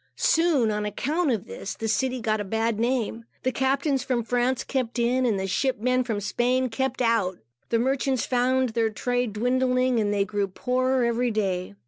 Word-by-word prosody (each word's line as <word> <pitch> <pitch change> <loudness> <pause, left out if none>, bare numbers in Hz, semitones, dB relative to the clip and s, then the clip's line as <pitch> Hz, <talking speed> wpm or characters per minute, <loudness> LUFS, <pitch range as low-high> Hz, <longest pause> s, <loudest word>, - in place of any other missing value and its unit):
Soon, 315 -9 +3
on 210 0 -2
account 290 - -1
of 220 -7 -1
this, 195 - -6
the 225 - -4
city 255 +3 0
got 215 -1 0
a - - -2
bad 225 +2 -1
name. 230 -1 -1 0.2
The 255 - +1
captains 270 +1 0
from 245 -3 -1
France 245 +2 0
kept 255 -3 -2
in, 250 +2 +2
and 210 -4 +1
the 190 - -2
ship 255 +7 0
men 255 +2 +2
from 225 -4 -2
Spain 245 +5 0
kept 260 +2 -1
out. 215 -6 +1 0.3
The 230 - +2
merchants 265 +1 0
found 255 +1 +1
their 225 0 +1
trade 245 +1 -1
dwindling, 255 +2 +1
and 205 -1 +1
they 200 -1 +1
grew 205 -1 -1
poorer 255 +5 0
every 235 +1 +1
day. 190 - -2
245 Hz, 185 wpm, -25 LUFS, 220-255 Hz, 0.3 s, Soon